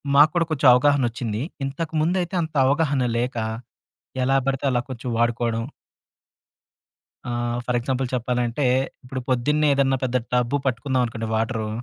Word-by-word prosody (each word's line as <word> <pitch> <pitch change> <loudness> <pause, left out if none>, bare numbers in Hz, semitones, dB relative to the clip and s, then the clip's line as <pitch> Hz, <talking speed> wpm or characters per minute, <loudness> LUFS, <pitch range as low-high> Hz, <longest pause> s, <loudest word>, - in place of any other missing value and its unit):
మాకూడా 155 +4 +5
కొచెం 145 -3 +2
అవగాహన 140 +2 +3
వచ్చింది. 115 -2 -3 0.2
ఇంతకుముందు 160 +4 -1
అయితే, 175 +2 -6
అంత 155 -1 -7
అవగాహన 140 -2 +1
లేక, 120 +1 -2 0.9
ఎలా 135 +1 +3
బడితే 135 0 -1
అలా, 120 -1 +1
కొంచెం 125 0 -5
వాడుకోవడం. 115 -1 0 1.7
ఆహ్! 120 0 -2
ఫర్ 125 -1 +1
ఎగ్జాంపుల్ 130 +2 -1
చెప్పాలంటే, 125 +2 -1 0.4
ఇప్పుడు 130 +1 -5
పొద్దున్నే, 150 +5 +2
ఏదన్నా 135 -1 +2
పెద్ద 125 0 +1 0.2
టబ్బు 125 +3 +2
పట్టుకుందామనుకోండి 125 -3 -1
వాటరు. 110 -1 -1
130 Hz, 125 wpm, -23 LUFS, 120-140 Hz, 1.7 s, మాకూడా